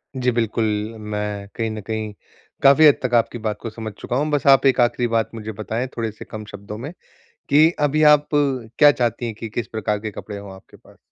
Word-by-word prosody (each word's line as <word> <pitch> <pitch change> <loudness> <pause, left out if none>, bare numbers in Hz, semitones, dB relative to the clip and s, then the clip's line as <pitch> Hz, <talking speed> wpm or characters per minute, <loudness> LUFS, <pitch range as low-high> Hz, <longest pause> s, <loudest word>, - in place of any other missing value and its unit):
जी, 125 -1 +1
बिल्कुल, 115 -1 0 0.4
मैं 105 -1 -4
कहीं 115 -1 -2
न 110 0 -6
कहीं 110 -1 -3 0.5
काफ़ी 140 +3 +7
हद 145 - +5
तक 125 - -2
आपकी 115 +1 +1
बात 110 -2 -3
को 115 - -5
समझ 110 0 -7
चुका 120 - -5
हूँ। 150 +2 0
बस 145 -1 0
आप 135 0 +6
एक 135 -1 +4
आखिरी 120 0 +1
बात 115 -1 0
मुझे 110 -1 -6
बताएँ 110 +4 -4
थोड़े-से 110 -2 -4
कम 110 -1 -8
शब्दों 100 +1 -8
में, 135 +7 -6 0.6
कि 155 +3 +6
अभी 150 +1 +2
आप 150 0 +1
क्या 140 -1 +3
चाहती 120 -3 -1
हैं 115 -2 -4
कि 115 +1 -7
किस 115 +1 -4
प्रकार 105 -1 -2
के 110 0 -5
कपड़े 105 0 -8
हों 100 -1 -9
आपके 95 - -18
पास? - - -21
115 Hz, 215 wpm, -21 LUFS, 110-130 Hz, 0.6 s, काफ़ी